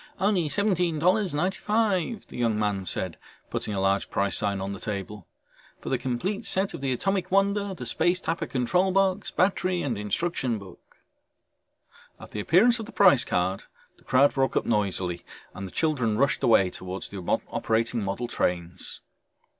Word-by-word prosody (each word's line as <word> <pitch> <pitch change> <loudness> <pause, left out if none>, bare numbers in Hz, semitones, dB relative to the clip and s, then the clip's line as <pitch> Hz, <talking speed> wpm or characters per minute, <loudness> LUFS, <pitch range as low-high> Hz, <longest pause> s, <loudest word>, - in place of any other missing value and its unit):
"Only 190 -6 +2
$17.95," 190 - +1
the - - -13
young 115 -3 +1
man 100 -3 -1
said, 90 0 -1 0.3
putting 105 - -2
a - - -1
large 95 +1 +1
price 100 0 0
sign 100 -2 0
on 95 +1 -3
the 100 - -6
table. 105 -2 -5 0.5
"For - - -6
the 130 - 0
complete 155 - -2
set 190 +1 +1
of - - -7
the 135 -1 -1
Atomic 195 +8 -1
Wonder, 200 0 +1
the 125 - -7
Space 175 +9 +1
Tapper 165 -1 -2
control 180 +9 +1
box, 195 +1 +1
battery 185 -1 +1
and 120 -7 -2
instruction 120 - -1
book 100 -2 -14 0.6
..." - - -30
At - - -12
the 105 - -4
appearance 215 - +4
of 220 - -6
the - - -10
price 185 - +5
card 95 +2 -1 0.3
the - - -24
crowd 135 +3 +4
broke 135 -1 +1
up - - 0
noisily 95 -5 -1 0.3
and 95 +1 -6
the - - -11
children 125 - 0
rushed 140 +3 +2
away 100 -6 +4
towards 95 +1 -6
the 100 - -7 0.3
operating 115 0 0
model 100 +5 -3
trains. 85 -5 -2
130 Hz, 165 wpm, -26 LUFS, -, 0.6 s, price